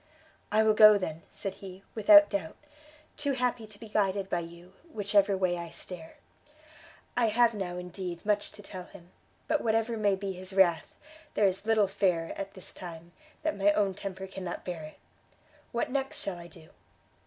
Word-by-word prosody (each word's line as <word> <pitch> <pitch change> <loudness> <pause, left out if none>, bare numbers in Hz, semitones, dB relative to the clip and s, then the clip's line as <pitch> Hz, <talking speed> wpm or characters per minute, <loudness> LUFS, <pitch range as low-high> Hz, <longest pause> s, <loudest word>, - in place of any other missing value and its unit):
"I 215 +1 +4
will 220 0 +4
go 215 -1 +9
then," 165 -4 -4
said 195 - -5
he, 190 0 -10
"without 305 +7 +7
doubt: 195 -6 -3 0.6
too 285 -1 0
happy 245 -3 -1
to 205 -1 -15
be 225 - -9
guided 195 -2 0
by - - +1
you, 170 +2 -10 0.2
which 205 -6 -4
ever 200 -1 +5
way 180 -2 0
I 170 -1 -6
steer. 165 -1 -9 1.0
I 240 -1 +3
have 235 +2 +4
now, 185 -4 -4
indeed 180 0 -6
much 210 -1 0
to 205 - -12
tell 185 -2 -8
him; 175 0 -15 0.4
but 310 -1 +1
whatever 225 +1 +1
may 205 -2 +2
be 195 0 -4
his 185 +1 -8
wrath, 180 -4 +3 0.4
there 210 - +4
is 195 +2 0
little 220 -2 +4
fear, 180 -4 0
at 195 0 -6
this 185 - -6
time, 170 -2 -9 0.3
that 315 0 0
my 205 +1 +4
own 205 -2 +1
temper 190 0 -6
cannot 190 -2 -6
bear 175 -3 -4
it! 155 0 -10 0.7
what 235 +1 -1
next 270 0 -2
shall 185 -3 -4
I 170 - -10
do?" 160 -1 -16
195 Hz, 185 wpm, -29 LUFS, 180-215 Hz, 1.0 s, go